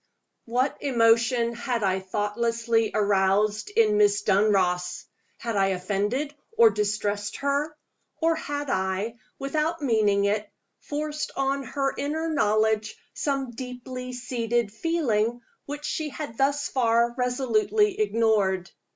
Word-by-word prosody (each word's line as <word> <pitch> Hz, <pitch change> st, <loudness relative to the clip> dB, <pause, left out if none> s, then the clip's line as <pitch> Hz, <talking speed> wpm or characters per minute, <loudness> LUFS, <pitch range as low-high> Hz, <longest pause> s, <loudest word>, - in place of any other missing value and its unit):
WHAT 250 Hz, +4 st, 0 dB
emotion 235 Hz, -2 st, +3 dB
had 235 Hz, -1 st, -2 dB
I 190 Hz, -1 st, +1 dB
thoughtlessly 225 Hz, +3 st, 0 dB
aroused 205 Hz, +1 st, +2 dB
in 210 Hz, 0 st, +3 dB
Miss 205 Hz, 0 st, +3 dB
Dunross? 190 Hz, -1 st, +1 dB, 0.3 s
Had 230 Hz, -2 st, -4 dB
I 195 Hz, -1 st, +3 dB
offended 205 Hz, +10 st, -1 dB, 0.2 s
or 455 Hz, -1 st, +7 dB
distressed 205 Hz, 0 st, -1 dB
her? 285 Hz, +2 st, -1 dB, 0.4 s
Or 330 Hz, 0 st, +2 dB
had 290 Hz, -2 st, -4 dB
I, 190 Hz, +5 st, -1 dB, 0.2 s
without 305 Hz, +3 st, -1 dB
meaning 210 Hz, -5 st, +3 dB
it, 205 Hz, +1 st, 0 dB, 0.3 s
forced 300 Hz, 0 st, -3 dB
on 275 Hz, 0 st, 0 dB
her 275 Hz, 0 st, -2 dB
inner 305 Hz, +4 st, -2 dB
knowledge 215 Hz, -5 st, +1 dB, 0.2 s
some 275 Hz, -3 st, -2 dB
deeply 250 Hz, +1 st, -7 dB
seated 240 Hz, -3 st, -1 dB
feeling 240 Hz, -5 st, 0 dB, 0.3 s
which 290 Hz, +1 st, -5 dB
she 310 Hz, -1 st, -2 dB
had 290 Hz, -5 st, -6 dB
thus 280 Hz, +3 st, +1 dB
far 235 Hz, -2 st, +2 dB
resolutely 255 Hz, -, +1 dB
ignored? 210 Hz, -, +1 dB
230 Hz, 115 wpm, -26 LUFS, 210-275 Hz, 0.4 s, or